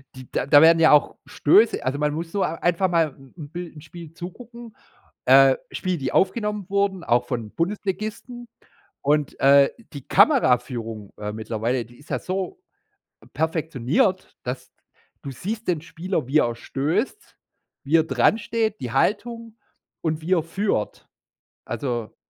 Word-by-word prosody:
die 130 -1 -11
da 145 +1 +5
werden 165 +1 +7
ja 160 -1 +6
auch 150 - +4
Stöße 210 +10 +3
also, 140 +3 -1
man 150 0 0
muss 165 +1 -5
so 200 -2 0
einfach 175 +3 0
mal 165 -2 +3
'n 135 -1 -18
'n 145 -3 -8
bill 175 -1 -7
'n 150 - -11
Spiel 165 0 -11
zugucken, 230 +6 -10 0.5
äh, 135 0 +6
Spiele 185 -1 -2
die 135 -3 -3
aufgenommen 210 0 0
wurden, 200 -2 0
auch 120 +1 +2
von 115 -4 -4
Bundesligisten. 215 +6 -4 0.5
Und, 145 0 0
äh, 140 0 +6 0.2
die 140 -3 -9
Kameraführung, 120 - +2
äh, 105 0 -4
mittlerweile, 110 +2 -2
die 120 +1 -18
ist 145 - -19
ja - - -1
so 195 - -4 0.8
perfektioniert, 160 - 0
dass 125 +1 -6 0.5
du 140 - -6
siehst 210 - -5
den 170 -4 +1
Spieler, 175 -4 -3
wie 145 +3 +3
er 120 -5 +2
stößt, 150 - -3 0.5
wie 155 +4 +3
er 160 - +3
dransteht, 215 - +1
die 120 -2 -5
Haltung 230 - -1 0.4
und 160 -1 -2
wie 180 +4 -3
er 165 - +1
führt. 165 - -2 0.6
Also, 120 -1 -4
160 Hz, 150 wpm, -23 LUFS, 130-195 Hz, 0.8 s, werden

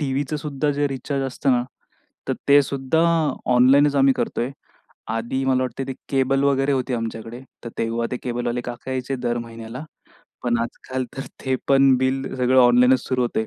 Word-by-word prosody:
टीव्हीचं 140 +1 -1
सुद्धा 150 0 -2
जे 145 0 0
रिचार्ज 135 +1 -3
असतं 135 +1 -1
ना, 120 -1 +2 0.7
तर - - +1
ते 145 +1 +8
सुद्धा 135 +3 -1 0.5
ऑनलाईनचं 140 +3 +5
आम्ही 135 0 +5
करतोय. 120 +2 -2 0.6
आधी 115 +4 -2
मला 130 -1 +2
वाटत 130 +1 -4
ते 135 - -2 0.2
केबल 135 0 +2
वगैरे 140 0 +2
होती 130 -1 -1
आमच्याकडे 115 +1 -5 0.2
तर 115 - -4
तेव्हा 115 +1 -1
ते - - 0
केबल 120 -1 -3
वाले 120 +1 -1
काका 120 +1 -7
यायचे 130 +1 -2
दर 120 -1 -2
महिन्याला. 115 +3 -8 0.6
पण 120 -1 +1
आजकाल 130 +2 -4
तर 135 - -3 0.2
ते 130 -1 +1
पण 135 -1 +5
बिल 130 +1 -1
सगळं 130 +1 +3
ऑनलाईन 125 +1 +6
च - - -10
सुरु 130 -1 +1
होतंय. 110 -2 -1
130 Hz, 180 wpm, -22 LUFS, 120-135 Hz, 0.7 s, ते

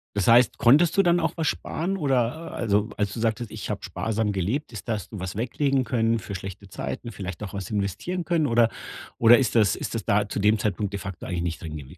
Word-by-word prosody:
Das 100 - 0
heißt, 120 0 +5
konntest 150 +8 +5
du 195 - +6
dann 175 -2 +3
auch 160 -2 0
was 160 - 0
sparen, 185 +7 -2
oder 140 +1 0
also 105 -1 +1
als 105 -1 0
du - - -5
sagtest: 115 0 -1
„Ich 105 - -6
hab - - -5
sparsam 110 -1 -1
gelebt“, 105 - -2
ist 110 0 -9
dass 105 -3 -3
du 105 - -7
was 95 0 -5
weglegen 130 +4 0
können 115 -1 +1
für 100 -1 -7
schlechte 95 +1 -8
Zeiten, 115 +5 -5
vielleicht 95 -3 -7
auch 100 -3 -6
was 100 0 -5
investieren 105 - -2
können 165 -3 +1
oder 115 -3 +4 0.5
oder 120 +1 +7
ist 125 -3 0
das 105 -3 +4
ist - - -5
das 110 - -3
da 100 0 +2
zu - - -3
dem 105 +2 +3
Zeitpunkt 100 0 -1
de 100 - -3
facto 95 -1 -7
eigentlich 90 -2 -2
nicht 85 -1 -3
drin 80 -2 -6
gewes 75 +4 -11
110 Hz, 235 wpm, -25 LUFS, 100-125 Hz, 0.5 s, oder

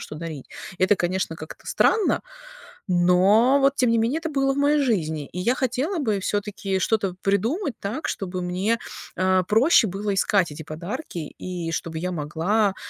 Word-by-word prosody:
что - - -8
дарить. 155 -4 -7 0.3
Это, 190 +2 +4
конечно, 175 -2 -1
как-то 155 0 -10
странно. 440 -3 +2 0.7
Но 190 +9 +4
вот, 275 +1 +3
тем 250 -2 +3
не 230 - +3
менее, 235 +7 +1
это 325 -1 -4
было 270 -2 +1
в 270 - -5
моей 290 +1 +3
жизни, 160 - -1
и 180 - -6
я 240 +7 +2
хотела 270 - -1
бы 220 -8 0
всё-таки 200 -1 -2
что-то 195 -2 0
придумать 235 - 0
так, 220 +10 -4
чтобы 185 -2 -3
мне, 190 +6 0 0.4
а, 185 0 +2
проще 225 - +4
было 200 +1 -2
искать 195 -2 +2
эти 155 +2 -8
подарки 170 - -6 0.2
и 175 -3 -4
чтобы 160 0 -3
я 180 +2 -2
могла, 175 +7 0
200 Hz, 170 wpm, -24 LUFS, 180-245 Hz, 0.7 s, Это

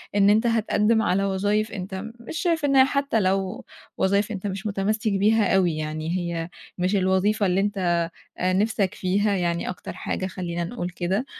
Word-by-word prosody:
إن 200 0 +5
أنت 220 +3 +4
هتقدّم 220 0 +2
على 195 -1 +1
وظايف 205 +3 0
أنت 190 +1 -5
مش 235 +7 -7
شايف 330 -4 +1
إن 275 -1 +2
هي 265 0 +8
حتّى 280 -4 0
لو 190 0 -1 0.3
وظايف 200 +3 +1
أنت 200 0 -4
مش 195 +2 -4
متمسِّك 210 +2 0
بيها 205 +1 +3
أوي 175 -5 +2
يعني 155 +3 -3
هي 170 -1 -3 0.3
مش 185 +3 +1
الوظيفة 195 +3 +2
اللي 185 +1 +2
أنت 185 -4 0 0.4
آآ، 185 +1 +1
نِفسَك 205 0 +1
فيها 200 +3 +1
يعني 170 -1 -1
أكتر 180 - -6
حاجة 185 +1 -3
خلّينا 175 -2 -4
نقول 180 -2 -4
كده 190 +7 -2
195 Hz, 175 wpm, -24 LUFS, 185-215 Hz, 0.4 s, هي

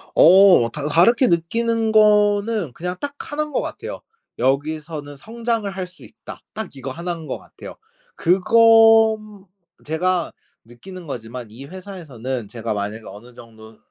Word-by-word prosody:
어 180 -8 +6
다 150 0 -4
다르게 230 - +4
느끼는 225 +6 0
거는 210 - +3
그냥 180 +2 -5
딱 285 0 -5 0.2
1 305 +1 -1
인 300 - -9
것 - - 0
같아요. - - -7 0.4
'여기서는 145 +3 -2
성장을 225 - -3
할 190 -2 -5
수 180 - -17
있다.' 225 - -12
딱 220 -3 -5
이거 135 0 -6
1 170 +5 -5
인 165 -2 -9
것 - - -4
같아요. - - -12 0.4
그건 220 +1 +4 0.4
제가 175 +3 -1 0.3
느끼는 170 +9 -12
거지만 120 -1 -7
이 125 +6 -11
회사에서는 140 - -7
제가 115 -1 -4
만약에 105 +2 -5
어느 120 +4 -12
정도 110 -2 -15
175 Hz, 270 characters per minute, -21 LUFS, 130-215 Hz, 0.4 s, 어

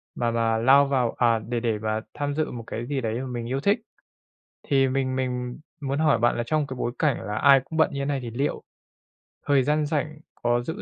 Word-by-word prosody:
mà 120 -1 0
mà 115 -1 +1
lao 135 +5 +6
vào, 130 -4 +1
à, 115 -2 +3
để 120 +2 -3
để 115 -2 -1
mà 110 0 -1
tham 145 0 -3
dự 155 0 -1
một 120 -1 -6
cái 115 - -4
gì 140 -1 -1
đấy 115 +1 -2
m 130 -2 -5
mình 115 -1 -4
yêu 135 +2 -1
thích. 200 - +2 0.9
Thì 135 -1 +3
mình 130 0 -1
mình 125 -1 -3 0.2
muốn 140 0 -2
hỏi 150 -8 +3
bạn 120 +1 +2
là 120 - 0
trong 150 +1 +1
cái 130 - -6
bối 120 - -1
cảnh 150 -3 +1
là 105 +2 -4
ai 135 0 +6
cũng 160 - -6
bận 160 - +4
như 140 - -3
thế 140 - -1
này 140 -1 -1
thì 120 - -5
liệu 135 +5 -2 0.8
thời 140 -2 +4
gian 150 +3 +1
rảnh 150 0 -2 0.2
có 120 0 +1
giữ 160 +12 -5
130 Hz, 240 wpm, -25 LUFS, 120-145 Hz, 0.9 s, lao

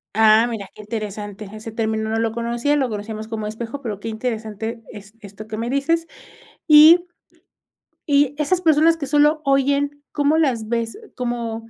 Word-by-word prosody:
Ah, 220 +1 +5
mira, 215 -4 -5
qué - - -12
interesante, 210 -1 -6
ese 215 +1 -8
término 220 -1 -2
no 220 - -1
lo 225 0 0
conocía, 235 +5 -1
lo 270 -4 0
conocíamos 215 0 -6
como 220 -1 -5
espejo, 225 +5 -6
pero, 215 -6 -5
qué 205 - -7
interesante 220 0 -4
es 205 -1 -12
esto 210 0 -11
que 220 0 -6
me 230 +2 -3
dices, 330 +5 0 0.6
y 315 +3 +8 1.0
y 285 -1 +2
esas 310 +5 +1
personas 325 -1 +4
que 300 - -4
solo 295 +2 +3
oyen, 280 +1 +1
¿cómo 290 +2 +1
las 250 -9 0
ves, 230 0 -2 0.2
cómo?, 235 -2 -4
230 Hz, 165 wpm, -21 LUFS, 220-285 Hz, 1.0 s, y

